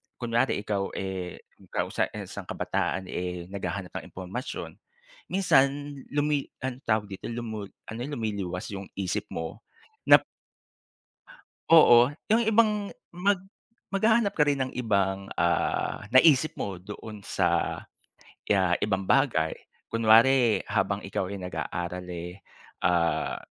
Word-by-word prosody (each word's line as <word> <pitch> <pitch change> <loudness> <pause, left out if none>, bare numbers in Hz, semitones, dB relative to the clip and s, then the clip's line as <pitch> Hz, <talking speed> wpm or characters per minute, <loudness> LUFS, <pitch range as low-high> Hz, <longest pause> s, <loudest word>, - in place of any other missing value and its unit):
kunwari 120 -2 0
ikaw 100 -2 -2
eh, 95 -2 -5 0.3
'kaw - - -1
sa - - +1
isang - - -7
kabataan 95 - -1
eh 90 -1 -4
naghahanap 100 -1 -5
ng - - -12
impormasyon, 95 +7 -6 0.5
minsan 140 -8 +4 0.4
lumi 145 -1 0 0.2
anong 130 +1 -4
tawag 110 -2 +1
dito 95 - -6
lumul 110 -3 -5 0.2
lumiliwas 110 -8 -4
'yong 100 -1 -6
isip 95 -3 -2
mo 80 +6 -5 0.5
nap - - +9 1.5
Oo 125 -7 +8 0.2
yung 230 - +4
ibang 220 -1 +4 0.4
mag 195 +3 +2 0.6
maghahanap 220 +1 +3
ka 155 - +1
rin 145 -1 +3
ng 130 - -8
ibang 100 -4 0
ah, 85 0 +1
naisip 140 +3 +5
mo 100 -3 -3
doon 105 +2 -9
sa, - - +1 0.7
kaya 95 -3 +3
ibang 95 -2 0
bagay. 115 - +2 0.4
Kunware 115 0 +5
habang 100 -1 0
ikaw 95 -1 -2
ay 100 - -5
nag-aaral 90 +1 -4
eh, 90 +1 -6 0.4
ah, 85 -1 +1
105 Hz, 115 wpm, -27 LUFS, 95-135 Hz, 1.5 s, nap